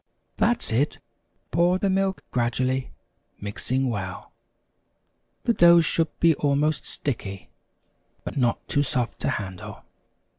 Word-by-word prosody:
That's 240 Hz, -, +1 dB
it 130 Hz, +7 st, +1 dB, 0.5 s
pour 175 Hz, +2 st, +3 dB
the 200 Hz, -, 0 dB
milk 195 Hz, 0 st, 0 dB
gradually, 130 Hz, +2 st, 0 dB, 0.5 s
mix 100 Hz, +4 st, -6 dB
well 115 Hz, -8 st, -2 dB, 1.1 s
the 235 Hz, -, +2 dB
dough 170 Hz, -3 st, +7 dB
should 165 Hz, 0 st, +1 dB
be 165 Hz, -1 st, +5 dB
almost 145 Hz, +1 st, +1 dB
sticky, 100 Hz, -8 st, -4 dB, 0.7 s
but -, -, -6 dB
not 120 Hz, -4 st, 0 dB
too 145 Hz, -, +2 dB
soft 125 Hz, -3 st, -1 dB
to -, -, -1 dB
handle. 95 Hz, -3 st, -5 dB
140 Hz, 115 wpm, -25 LUFS, 120-170 Hz, 1.1 s, dough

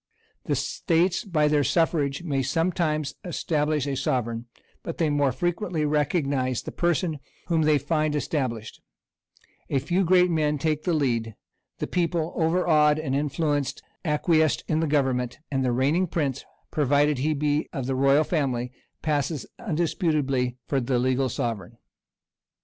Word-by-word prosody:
The -, -, 0 dB
states 175 Hz, +4 st, +1 dB
by 160 Hz, -8 st, +1 dB
their 150 Hz, -1 st, +3 dB
suffrage 150 Hz, -2 st, +1 dB
may 140 Hz, -5 st, 0 dB
sometimes 155 Hz, +1 st, 0 dB
establish 155 Hz, -4 st, -1 dB
a 140 Hz, -1 st, -2 dB
sovereign; 120 Hz, -2 st, -1 dB, 0.3 s
but 165 Hz, -, -6 dB
they 160 Hz, -3 st, +1 dB
more 145 Hz, -2 st, +2 dB
frequently 175 Hz, -, -1 dB
recognize 140 Hz, -4 st, 0 dB
the -, -, -6 dB
person 170 Hz, -2 st, 0 dB, 0.3 s
whom 165 Hz, -2 st, +2 dB
they 155 Hz, -1 st, +4 dB
find 155 Hz, +1 st, 0 dB
established: 130 Hz, -7 st, -3 dB, 0.9 s
a 140 Hz, -, +1 dB
few 180 Hz, +8 st, +1 dB
great 180 Hz, 0 st, +4 dB
men 150 Hz, -2 st, +1 dB
take 155 Hz, +1 st, -1 dB
the 175 Hz, -3 st, +2 dB
lead; 115 Hz, -7 st, 0 dB, 0.4 s
the -, -, -2 dB
people, 170 Hz, -2 st, -1 dB
overawed 160 Hz, -3 st, +3 dB
and 155 Hz, -4 st, -2 dB
influenced, 145 Hz, 0 st, -1 dB, 0.2 s
acquiesce 155 Hz, -1 st, +2 dB
in 155 Hz, -, +1 dB
the 160 Hz, -, +1 dB
government; 130 Hz, -4 st, 0 dB
and 135 Hz, -1 st, 0 dB
the 125 Hz, -, +1 dB
reigning 145 Hz, +9 st, +2 dB
prince, 140 Hz, -5 st, -2 dB, 0.3 s
provided 145 Hz, -1 st, +2 dB
he 155 Hz, +3 st, +1 dB
be 150 Hz, +1 st, 0 dB
of 135 Hz, -5 st, -4 dB
the 135 Hz, -, -1 dB
royal 135 Hz, +3 st, +4 dB
family, 130 Hz, -7 st, -1 dB, 0.3 s
passes 150 Hz, -1 st, -1 dB
undisputedly 150 Hz, -, 0 dB
for 135 Hz, -2 st, 0 dB
the 125 Hz, +1 st, 0 dB
legal 130 Hz, +1 st, +1 dB
sovereign. 115 Hz, -1 st, -4 dB
150 Hz, 145 wpm, -25 LUFS, 135-160 Hz, 0.9 s, they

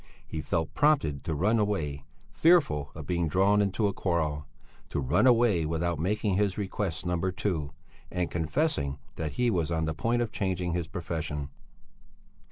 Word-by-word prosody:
He 80 Hz, -, -4 dB
felt 80 Hz, +1 st, -2 dB
prompted 140 Hz, -, +2 dB
to 80 Hz, -, -1 dB
run 105 Hz, +9 st, +2 dB
away, 75 Hz, -10 st, -1 dB, 0.3 s
fearful 145 Hz, -, +3 dB
of 80 Hz, -1 st, -7 dB
being 85 Hz, +1 st, 0 dB
drawn 100 Hz, +6 st, +3 dB
into 100 Hz, +2 st, +1 dB
a 100 Hz, -, -1 dB
quarrel, 75 Hz, -7 st, -1 dB, 0.4 s
to -, -, -2 dB
run 70 Hz, -, +3 dB
away 115 Hz, -8 st, +4 dB
without 80 Hz, +1 st, -1 dB
making 100 Hz, +2 st, 0 dB
his 100 Hz, -2 st, +1 dB
request 95 Hz, -4 st, -3 dB
number 90 Hz, +1 st, 0 dB
two, 85 Hz, -6 st, -2 dB, 0.4 s
and 90 Hz, -2 st, -2 dB
confessing 80 Hz, -, 0 dB, 0.2 s
that 80 Hz, -3 st, -3 dB
he 120 Hz, +5 st, +1 dB
was 85 Hz, -6 st, 0 dB
on 80 Hz, -1 st, 0 dB
the 80 Hz, -, -1 dB
point 120 Hz, +9 st, +1 dB
of 115 Hz, -, -5 dB
changing 90 Hz, -3 st, -1 dB
his 85 Hz, -2 st, -2 dB
profession. 80 Hz, -4 st, -4 dB
85 Hz, 165 wpm, -28 LUFS, 80-105 Hz, 0.4 s, away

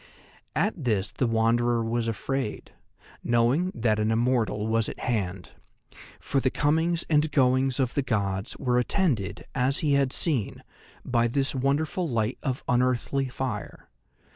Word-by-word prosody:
At 195 Hz, +9 st, +1 dB
this 105 Hz, -4 st, 0 dB
the 125 Hz, -, -1 dB
Wanderer 115 Hz, +1 st, +2 dB
was 115 Hz, 0 st, -1 dB
afraid, 115 Hz, +1 st, -3 dB, 0.5 s
knowing 120 Hz, +10 st, +2 dB
that 110 Hz, -2 st, +1 dB
an 110 Hz, 0 st, +1 dB
immortal 115 Hz, -2 st, +1 dB
was 115 Hz, 0 st, +1 dB
at -, -, -8 dB
hand; 100 Hz, -6 st, -2 dB, 0.7 s
for 140 Hz, -, 0 dB
the 130 Hz, -, +1 dB
comings 160 Hz, +5 st, +1 dB
and 150 Hz, 0 st, +2 dB
goings 130 Hz, -1 st, +2 dB
of 130 Hz, -2 st, 0 dB
the 140 Hz, -, +1 dB
gods 100 Hz, -6 st, -2 dB
were 125 Hz, -1 st, +1 dB
attended, 125 Hz, -, -1 dB
as 135 Hz, +1 st, +1 dB
he 145 Hz, -, +3 dB
had 140 Hz, -2 st, +2 dB
seen, 135 Hz, -, 0 dB, 0.4 s
by 120 Hz, -2 st, +2 dB
this 135 Hz, +3 st, 0 dB
wonderful 145 Hz, +6 st, 0 dB
light 115 Hz, 0 st, -1 dB
of 130 Hz, -1 st, -3 dB
unearthly 125 Hz, +2 st, +1 dB
fire. 125 Hz, -4 st, -5 dB
125 Hz, 140 wpm, -26 LUFS, 115-140 Hz, 0.7 s, he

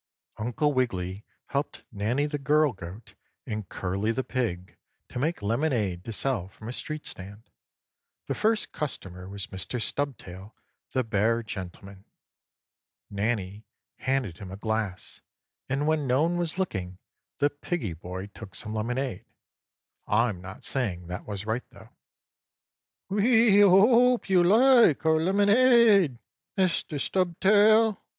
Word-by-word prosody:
3. 110 Hz, -, -3 dB
Uncle 145 Hz, +5 st, +1 dB
Wiggily 100 Hz, -6 st, -2 dB, 0.3 s
helped 140 Hz, +1 st, -3 dB
Nannie 110 Hz, +8 st, 0 dB
the 145 Hz, 0 st, -3 dB
girl 150 Hz, 0 st, +3 dB
goat, 95 Hz, +4 st, -10 dB, 0.3 s
and 105 Hz, -3 st, -5 dB
Curly 100 Hz, +4 st, -2 dB
the 130 Hz, +3 st, -2 dB
pig 100 Hz, -10 st, -3 dB, 0.3 s
to -, -, -5 dB
make 155 Hz, -3 st, -1 dB
lemonade 110 Hz, -, 0 dB
to 115 Hz, -, -5 dB
sell 110 Hz, -4 st, -1 dB
from 110 Hz, +3 st, -12 dB
a 120 Hz, -, -4 dB
street 155 Hz, +3 st, -6 dB
stand. 100 Hz, +4 st, -10 dB, 0.7 s
The -, -, -2 dB
first 220 Hz, 0 st, 0 dB
customer 95 Hz, -10 st, -6 dB
was 100 Hz, -1 st, -5 dB
Mr. 95 Hz, +6 st, -4 dB
Stubtail, 105 Hz, -5 st, -4 dB, 0.4 s
the 130 Hz, -, +1 dB
bear 115 Hz, +1 st, +1 dB
gentleman. 100 Hz, -2 st, -8 dB, 1.1 s
Nannie 105 Hz, -1 st, -2 dB, 0.3 s
handed 130 Hz, -10 st, -1 dB
him 95 Hz, -, -8 dB
a 95 Hz, -, -7 dB
glass, 110 Hz, -3 st, -4 dB, 0.5 s
and 135 Hz, +2 st, 0 dB
when 155 Hz, -2 st, +1 dB
no 130 Hz, +4 st, +3 dB
one 175 Hz, +1 st, 0 dB
was 170 Hz, 0 st, -2 dB
looking 95 Hz, -, -3 dB, 0.4 s
the 145 Hz, 0 st, +2 dB
piggie 145 Hz, -, -4 dB
boy 90 Hz, +3 st, -7 dB
took 95 Hz, -5 st, -10 dB
some 110 Hz, -, -4 dB
lemonade. 120 Hz, 0 st, -3 dB, 0.8 s
I'm 105 Hz, -4 st, +1 dB
not 95 Hz, +2 st, -10 dB
saying 90 Hz, -10 st, -2 dB
that 90 Hz, +1 st, -6 dB
was 100 Hz, -1 st, -5 dB
right, 110 Hz, +3 st, -2 dB
though. -, -, -16 dB, 1.2 s
"We 215 Hz, +1 st, +4 dB
hope 225 Hz, +4 st, +5 dB
you 180 Hz, -2 st, +5 dB
like 225 Hz, -, +5 dB
our 160 Hz, 0 st, +4 dB
lemonade, 205 Hz, -, +5 dB, 0.4 s
Mr. 170 Hz, -5 st, 0 dB
Stubtail." 205 Hz, +5 st, +3 dB
125 Hz, 130 wpm, -27 LUFS, 100-165 Hz, 1.2 s, hope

